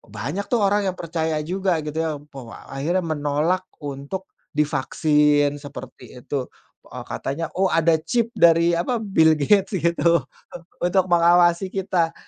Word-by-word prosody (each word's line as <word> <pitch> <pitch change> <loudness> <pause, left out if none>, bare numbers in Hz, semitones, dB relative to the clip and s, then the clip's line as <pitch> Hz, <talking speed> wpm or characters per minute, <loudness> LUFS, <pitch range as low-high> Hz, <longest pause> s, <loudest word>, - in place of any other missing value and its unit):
banyak, 145 - -4
tuh, 235 -4 +1
orang 200 0 +2
yang 185 - -2
percaya 160 -2 -2
juga, 180 -2 -1
gitu, 150 +1 -6
ya. 160 0 0
Pe 145 -2 -12
wa 120 -3 -12
akhirnya 170 +7 -1
menolak 155 +4 -1 0.2
untuk 145 +7 -6 0.3
divaksin, 150 0 +2
seperti 145 -3 -11
itu, 135 -3 -3 0.4
eee, - - -8
katanya, 140 - -3
oh, 190 - +3
ada 165 0 +3
chip 230 +8 0
dari 170 0 +5
apa, 235 +8 -1
Bill 160 -7 +4
Gates, 195 +7 +2
gitu, 170 0 +2 0.6
untuk 180 +1 +2
mengawasi 175 +2 +4
kita. 180 -4 0
165 Hz, 140 wpm, -22 LUFS, 150-185 Hz, 0.6 s, dari